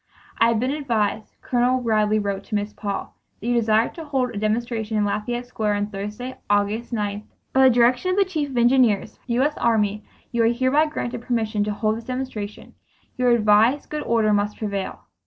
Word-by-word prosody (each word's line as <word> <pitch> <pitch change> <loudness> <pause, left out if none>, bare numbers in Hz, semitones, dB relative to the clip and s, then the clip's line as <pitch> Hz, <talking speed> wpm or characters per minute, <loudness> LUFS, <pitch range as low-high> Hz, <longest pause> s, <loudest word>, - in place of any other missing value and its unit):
"I 230 - +6
have 230 -2 +2
been 255 +3 0
advised 225 -7 -1
[Col. 250 +1 +2
Ridley 215 -2 +2
wrote 200 -2 -2
to - - -4
Miss 205 0 -2
Paul 200 -2 -4 0.3
that - - -10
you 245 - +1
desire 225 -1 +3
to 330 - -9
hold 265 -5 -1
a - - -5
demonstration 220 0 -1
in 210 - +2
Lafayette 240 +4 -2
Square 215 -4 -1
on 205 0 -1
Thursday, 210 +6 -6
August 205 +4 0
9.2d. 210 -2 -3 0.3
By 265 0 +6
direction 245 +7 +3
of 370 - 0
the 400 - +4
chief 310 -6 -2
of 260 - -5
engineers, 240 -4 +3
U. 245 +1 +2
S. 295 +1 0
Army, 210 -3 +1 0.3
you 235 - +1
are 225 - +4
hereby 260 +6 +2
granted 240 -6 -4
permission 220 -4 -1
to 210 - -1
hold 215 +1 0
this 230 - -9
demonstration. 250 -5 -5 0.4
You 250 - +1
are - - +6
advised 225 +4 +3
good 300 0 -2
order 220 -2 +2
must 205 0 0
prevail." 200 -3 -4
230 Hz, 195 wpm, -23 LUFS, 210-250 Hz, 0.4 s, I